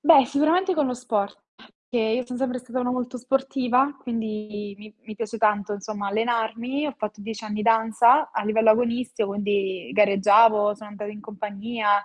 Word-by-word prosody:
Beh, 290 -3 +7
sicuramente 325 +8 +2
con 300 -4 +1
lo 250 - -2
sport, 220 -5 -3 0.5
che 245 - 0
io 225 +3 0
sono 245 0 -6
sempre 255 -1 -1
stata 255 +1 -6
una 245 0 -1
molto 250 0 -3
sportiva, 265 +1 0
quindi 215 -3 -5
mi 215 0 -14
mi 215 - -10
piace 225 +1 -5
tanto 210 -2 +1
insomma 205 0 -5
allenarmi. 230 +5 -1
Ho 285 - -4
fatto 215 0 -6
10 220 +1 -7
anni 210 -1 -5
di 210 - -2
danza 230 +5 +4
a 215 - -3
livello 220 +1 +4
agonistico, 235 -1 0
quindi 200 -2 -2
gareggiavo, 210 +1 +5
sono 210 0 -12
andata 210 0 -7
in 210 0 -10
compagnia, 210 0 -1
225 Hz, 175 wpm, -24 LUFS, 210-250 Hz, 0.5 s, Beh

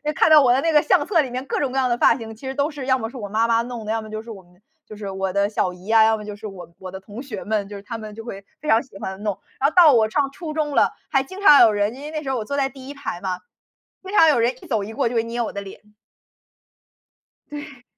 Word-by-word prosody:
看 - - +4
到 310 -2 +8
我 250 - +4
的 260 - +2
那 330 +1 +1
个 300 - +6
相 - - +2
册 340 -6 +3
里 265 - -4
面 255 +2 -4
各 - - -2
种 275 -3 -1
各 270 - -3
样 255 -2 +2
的 240 - +1
发 - - +5
型 225 -2 -8
其 265 +5 -10
实 265 - -3
都 285 +1 +1
是 290 -4 -7
要 260 0 +3
么 225 -1 -4
是 255 - -10
我 205 -4 -6
妈 220 +3 +1
妈 230 0 +3
弄 240 -2 -7
的， 215 - -3
要 225 0 -1
么 215 - -10
就 215 0 -5
是 230 - -13
我 200 -4 -9
们 180 +1 -26 0.2
就 215 - -11
是 205 -1 -6
我 190 -1 -3
的 200 +1 +1
小 185 -4 -1
姨 180 +1 -15
呀， 225 0 +6
要 220 0 +3
么 210 - -8
就 210 -1 -6
是 215 - -11
我 190 -4 -9
我 185 -1 -9
的 190 - -7
同 210 +6 -9
学 225 -8 -7
们， 210 -2 -1
就 205 - -9
是 200 - -8
他 230 +2 -6
们 215 -1 -8
就 225 - -9
会 200 -4 -8 0.2
非 305 - -5
常 225 +1 +4
喜 250 -7 -15
欢 190 +2 -6
弄。 205 -3 -2 0.2
然 275 - +3
后 - - -15
到 345 -4 +8
我 225 -3 +4
上 280 +2 +1
初 310 +1 -7
中 300 -2 -2
了， - - +4 0.2
还 270 -3 +2
经 375 +8 -10
常 300 -8 +8
有 230 - +7
人 205 +2 0
因 275 - -10
为 300 - -6
那 310 -1 -3
时 275 - -5
候 265 - 0
我 220 - -4
坐 280 - -3
在 270 -1 +1
第 265 0 -12
1 285 - -7
排 280 -10 -5
嘛， 185 -2 -3 0.6
经 385 +2 -8
常 325 - +7
有 295 -6 +4
人 235 +2 +2
一 - - -13
走 220 -6 0
一 210 - -7
过 225 - 0
就 235 - -3
会 225 - +2
捏 235 +1 -3
我 230 - -3
的 200 - -4
脸。 195 -1 -10 1.7
对。 290 -4 -9
230 Hz, 340 characters per minute, -22 LUFS, 210-275 Hz, 1.7 s, 到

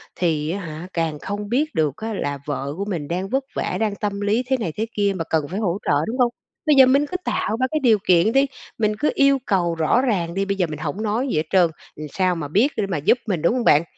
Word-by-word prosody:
thì 155 -3 0
á 200 - -3
hả, 165 0 -7
càng 160 -3 -1
không 205 +1 -5
biết 285 - 0
được 155 -4 +1
á 220 0 -4
là 145 -7 -3
vợ 140 -1 -3
của 200 - -2
mình 170 -8 -3
đang 185 +3 -3
vất 270 0 0
vả, - - -2
đang 215 -2 0
tâm 205 -1 -3
lý 215 +5 +1
thế 265 -1 +2
này 185 -9 -3
thế 220 - 0
kia 200 -1 +2
mà 165 - -2
cần 155 -3 +1
phải 190 +5 -4
hỗ 190 -3 0
trợ, - - +1 0.2
đúng 245 +4 -3
không? 245 -2 +4 0.4
Bây 300 - +5
giờ 265 -1 +9
mình 275 +3 +3
cứ 365 +5 -3
tạo 220 +2 -1
ra 260 - +3
cái 310 - +1
điều 225 -4 +5
kiện 180 +4 +5
đi, 270 +2 +4 0.3
mình 215 -1 +1
cứ 300 - +2
yêu 275 0 +4
cầu 175 -4 +1
rõ 160 +10 +2
ràng 180 -10 0
đi. 195 +1 -1
Bây 200 0 -2
giờ 180 -3 +1
mình 150 -2 -6
hổng 155 +7 -4
nói 225 +6 0
gì 195 - -1
hết 155 - +2
trơn, 180 -3 +4 0.3
làm 150 0 -7
sao 185 -2 +1
mà 150 -3 -4
biết 220 - +2
để 210 - +1
mà 175 -5 -2
giúp 160 - +3
mình, 180 -7 -1
đúng 170 - +3
hông 250 -2 0
bạn? 150 -4 +5
195 Hz, 280 wpm, -22 LUFS, 165-230 Hz, 0.4 s, giờ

